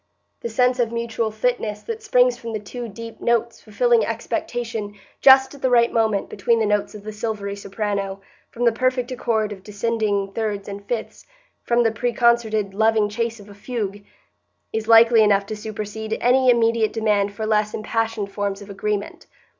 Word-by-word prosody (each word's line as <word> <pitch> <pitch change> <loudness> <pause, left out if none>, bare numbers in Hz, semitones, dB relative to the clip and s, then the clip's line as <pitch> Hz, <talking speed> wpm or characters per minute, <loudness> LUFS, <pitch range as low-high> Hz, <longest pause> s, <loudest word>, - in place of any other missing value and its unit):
The 235 - -4
sense 250 +2 +2
of 235 -2 +1
mutual 235 -1 -2
fitness 215 -1 -2
that 455 -1 -5
springs 250 - +3
from 230 -1 -7
the 215 - -2
two 240 +4 -7
deep 230 +2 -10
notes 235 0 0
fulfilling 485 -2 +2
expectation 225 -4 -3 0.3
just 265 0 +7
at 280 - -13
the 260 - +2
right 235 -1 +4
moment 220 -3 +1
between 235 -1 +1
the 220 - +2
notes 210 0 0
of 205 - -10
the 215 - -6
silvery 210 -2 -4
soprano, 200 -1 -3 0.3
from 240 +1 -3
the 235 - +5
perfect 255 +1 -1
accord 220 -4 -1
of 195 -2 -8
descending 205 -1 -1
thirds 210 -3 -3
and 200 0 -7
fifths, 235 -3 -5 0.3
from 240 0 +2
the 225 - +2
preconcerted 225 -3 +1
loving 220 0 +2
chase 230 +1 -3
of 205 - -13
a 205 - -12
fugue, 205 -2 -5 0.7
is 220 0 -2
likely 230 0 +7
enough 200 -2 +3
to 215 - -5
supersede 215 +1 -5
any 255 +1 +4
immediate 230 -2 +3
demand 205 -2 +1
for 220 - -3
less 215 -1 +1
impassioned 225 -2 -2
forms 200 -1 -3
of 200 - -11
agreement. 205 +1 -4
220 Hz, 175 wpm, -22 LUFS, 205-235 Hz, 0.7 s, just